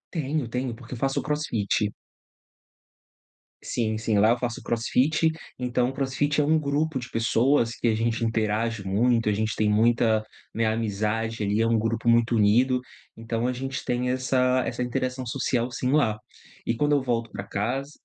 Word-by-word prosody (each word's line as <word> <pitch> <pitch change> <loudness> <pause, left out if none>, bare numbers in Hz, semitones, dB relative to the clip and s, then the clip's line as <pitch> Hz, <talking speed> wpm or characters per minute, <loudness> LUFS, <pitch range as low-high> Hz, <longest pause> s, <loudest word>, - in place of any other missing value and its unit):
Tenho, 155 -3 -1
tenho, 125 0 -3
porque 120 +1 -11
faço 135 +2 -1
o - - -12
crossfit. 110 -9 -1 1.7
Sim, 110 -2 -1
sim, 110 -2 0
lá 105 +2 +5
eu 120 - +1
faço 120 -2 -3
crossfit, 140 +7 +1 0.3
então 125 0 0
o - - -6
crossfit 140 +2 0
é - - +2
um 155 +2 +3
grupo 150 0 0
de 125 -1 -5
pessoas, 115 +1 +2
que - - -1
a - - +2
gente 115 +1 0
interage 110 -1 -1
muito, 115 +4 +2
a - - +3
gente 110 +1 -1
tem 105 -1 +1
muita, 110 0 +3 0.3
né, 115 - 0
amizade, 110 0 -1
ali, 105 +2 +1
é 115 - +2
um 115 0 +3
grupo 115 +1 0
muito 115 0 +3
unido. 120 +5 +3 0.3
Então 115 +1 -3
a 125 - 0
gente 135 +1 -5
tem 125 +1 0
essa 130 0 +1
essa - - -3
interação 130 0 -2
social 120 +1 -1
sim 125 +1 -2
lá. 135 -8 +2 0.5
E 115 - 0
quando 145 +5 +1
eu 140 - +1
volto 115 -3 -1
pra 100 - -6
casa 125 +9 -3
120 Hz, 175 wpm, -25 LUFS, 110-130 Hz, 1.7 s, lá